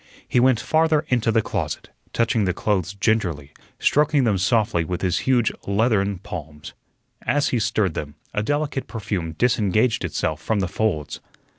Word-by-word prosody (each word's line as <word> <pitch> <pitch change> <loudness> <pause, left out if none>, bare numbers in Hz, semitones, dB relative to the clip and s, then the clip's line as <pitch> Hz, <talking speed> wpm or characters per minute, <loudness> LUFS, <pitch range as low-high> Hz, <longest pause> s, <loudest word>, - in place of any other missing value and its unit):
He - - +2
went 125 -2 +4
farther 160 +1 +2
into 120 -3 +2
the 110 0 +2
closet, - - -3 0.2
touching 115 -2 +1
the 90 -1 0
clothes 100 -2 -1
gingerly, 95 -9 0 0.3
stroking 150 -1 +3
them 105 -5 +2
softly 105 -3 +2
with 90 +3 -4
his 90 -2 +1
huge 120 -4 +3 0.2
leathern 100 -1 +1
palms. 80 -5 -8 0.5
As 145 +1 +1
he 125 - 0
stirred 105 -4 +1
them 75 -1 -5 0.2
a 105 - 0
delicate 145 +3 -1
perfume 95 -7 -4
disengaged 110 +2 +2
itself - - -2
from 110 -2 0
the 95 - 0
folds. 80 -7 -2
105 Hz, 155 wpm, -23 LUFS, 90-120 Hz, 0.5 s, went